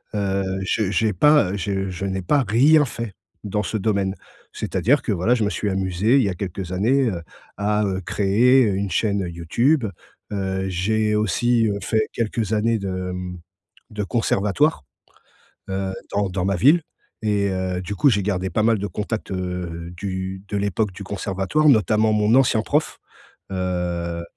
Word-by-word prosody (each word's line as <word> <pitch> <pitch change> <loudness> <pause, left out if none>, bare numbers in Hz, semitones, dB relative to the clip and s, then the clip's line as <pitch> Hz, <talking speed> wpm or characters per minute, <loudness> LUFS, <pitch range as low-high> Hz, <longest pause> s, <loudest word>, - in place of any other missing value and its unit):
heu, 100 -1 0 0.2
je 100 +1 0
j'ai 110 0 +1
pas, 150 -10 +4
heu, 100 - -3
je 95 0 -2
je 95 +1 -4
n'ai 95 0 -2
pas 140 +9 +2
rien 145 +9 +5
fait 115 -4 -6 0.3
dans 105 0 -1
ce 110 - -2
domaine. 100 -2 0 0.4
C'est-à-dire 120 - +1
que - - -1
voilà, 100 +6 +2
je 115 - 0
me 100 - +1
suis 105 - -2
amusé, 95 +4 +1
il 135 - +4
y 100 - +1
a - - -2
quelques 95 -1 -5
années, 120 +8 +2
heu, 90 -5 -4 0.4
à, 105 +1 +1
heu, 95 -1 -2
créer 105 +7 +3
une 100 -1 -1
chaîne, 100 +2 +1
heu, 90 - -4
YouTube, 115 - +1 0.5
heu, 95 -1 -2
j'ai 105 +4 0
aussi, 115 +3 +2
heu, 100 -1 -1
fait 110 +3 0
quelques 110 -2 -1
années 115 +2 +2
de, 100 -1 -4
mmh, 90 -1 -4 0.5
de 105 -1 -3
conservatoire, 105 - +1 0.9
heu, 95 0 -2 0.2
dans 100 0 +1
dans 90 -1 -2
ma 100 0 +1
ville 150 - +5 0.4
et 105 -2 +1
heu, 95 -1 -2
du 95 +3 -5
coup 140 - +4
j'ai 105 -4 +1
gardé 95 -1 -1
pas 110 - 0
mal 115 -1 +3
de 100 - -3
contacts, 105 +4 -4
heu, 90 -2 -4
du 95 0 -4
de 100 - -3
l'époque 100 +1 0
du 100 +2 -9
conservatoire. 100 +9 0
Notamment 110 - +4
mon 105 0 +2
ancien 125 -4 +4
prof, 150 +6 -1 0.5
heu, 90 -2 -2
100 Hz, 175 wpm, -22 LUFS, 95-110 Hz, 0.9 s, rien